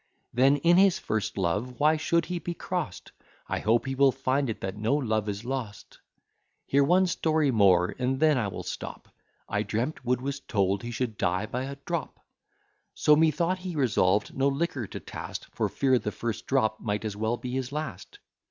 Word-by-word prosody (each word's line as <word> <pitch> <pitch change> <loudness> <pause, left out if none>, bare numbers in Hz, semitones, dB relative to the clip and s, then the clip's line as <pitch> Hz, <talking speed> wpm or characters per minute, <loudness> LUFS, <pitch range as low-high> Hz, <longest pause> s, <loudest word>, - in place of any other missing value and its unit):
Then 135 +4 +4
in 170 +5 +4
his 195 -1 +5
first 110 -2 -2
love 105 +7 -1
why 155 +2 +4
should 170 +2 +1
he 180 0 -3
be 170 +1 -5
crost? 175 - -4 0.4
I - - -2
hope 115 +2 +2
he 135 - -2
will 135 0 +5
find 135 +2 0
that 95 -3 -4
no 110 +6 +1
love 110 -7 0
is 100 +3 -5
lost. 120 -6 -5 0.7
Hear 140 +1 +3
one 180 +6 +4
story 160 -5 +1
more, 95 -6 +4
and 130 +1 0
then 155 -1 +4
I 120 -5 0
will 100 - -6
stop. - - -7 0.4
I - - -1
dreamt 125 +7 -2
Wood 125 0 +1
was 140 +2 -3
told 100 -6 0
he 120 - -6
should 115 -2 -3
die 90 +4 +1
by 125 +4 -3
a 140 +1 -6
drop: 170 -5 -3 0.8
So 150 - +5
methought 160 +4 +2
he 180 -2 -5
resolved 105 -7 +2
no 135 +1 +2
liquor 140 - -1
to - - -7
taste, - - -7
For - - -1
fear 130 -2 +2
the 105 - -3
first 115 -1 -4
drop 110 -5 +1
might 105 0 -2
as 105 -2 -3
well 110 +3 -1
be 125 - -6
his 130 0 -3
last. 155 - -6
130 Hz, 190 wpm, -27 LUFS, 110-150 Hz, 0.8 s, his